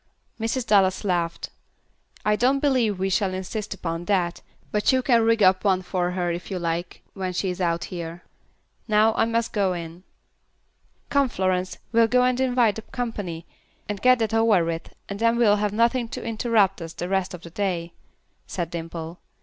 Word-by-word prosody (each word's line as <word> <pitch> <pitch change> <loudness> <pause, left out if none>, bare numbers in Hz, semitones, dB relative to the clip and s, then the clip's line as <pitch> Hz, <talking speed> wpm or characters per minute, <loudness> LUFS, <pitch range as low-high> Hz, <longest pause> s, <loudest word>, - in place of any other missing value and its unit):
Mrs. 230 +2 -1
Dallas 195 -3 +3
laughed. 175 -4 -1 0.7
"I 210 0 +3
don't 255 +5 +3
believe 255 -8 +2
we 190 +1 -1
will 190 -2 0
insist 200 +3 -4
upon 170 -2 -4
that, 175 -3 0 0.3
but 210 0 +2
you 260 -1 +2
can 235 -3 +4
rig 225 -1 +3
up 185 0 +4
one 190 -2 +2
for 180 -1 -1
her 175 -1 -1
if 170 +1 -5
you 190 - -3
like, 170 0 -3
when 185 -2 -3
she 185 +1 -1
is 180 - -6
out 170 -1 0
here. 170 0 -6 0.6
Now 215 0 +4
I 225 - +2
must 230 0 -1
go 195 -3 +1
in." 170 0 -7 1.1
"Come, 280 -2 +2
Florence, 185 -2 -1
we'll 230 -1 +5
go 250 +2 +3
and 250 0 +2
invite 245 -5 +2
the - - -5
company, 205 -9 -5 0.4
and 205 -1 -4
get 255 0 +6
that 225 -1 -1
over 225 -6 +4
with, 165 0 -4 0.2
and 200 0 -6
then 230 +1 +3
we'll 210 -3 +4
have 210 0 0
nothing 235 +3 +2
to - - -6
interrupt 220 -4 +1
us 165 0 -7
the 175 - -4
rest 190 -1 -1
of 175 - -13
the 170 - -10
day," 175 -3 -2 0.5
said 175 -3 -4
Dimple. 165 0 -6
195 Hz, 185 wpm, -24 LUFS, 175-225 Hz, 1.1 s, get